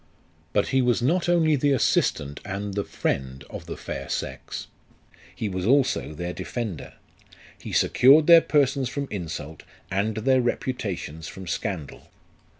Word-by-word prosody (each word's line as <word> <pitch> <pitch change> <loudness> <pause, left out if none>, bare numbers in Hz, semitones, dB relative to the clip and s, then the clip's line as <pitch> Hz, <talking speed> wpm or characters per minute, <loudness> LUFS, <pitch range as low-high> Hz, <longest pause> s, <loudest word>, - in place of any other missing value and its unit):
But 105 - +1
he 135 - +3
was 120 -1 +2
not 175 +7 +2
only 160 -3 +4
the 140 +1 +2
assistant 75 - +1
and 100 +1 -4
the 100 +1 -1
friend 65 -4 -3
of - - -8
the - - -6
fair - - -6
sex; - - -4 0.7
he 110 - -3
was 95 -2 -3
also 130 - +2
their 90 +2 -4
defender. 95 +1 -5 0.7
He - - -7
secured 145 +5 +5
their 170 0 +9
persons 140 -4 +1
from 140 +2 -3
insult, 80 -5 -5 0.3
and 100 +3 0
their 130 +4 +3
repu 125 +1 -1
tations 85 -8 -5
from 95 - -9
scandal. 90 -3 -4
110 Hz, 150 wpm, -25 LUFS, 90-135 Hz, 0.7 s, their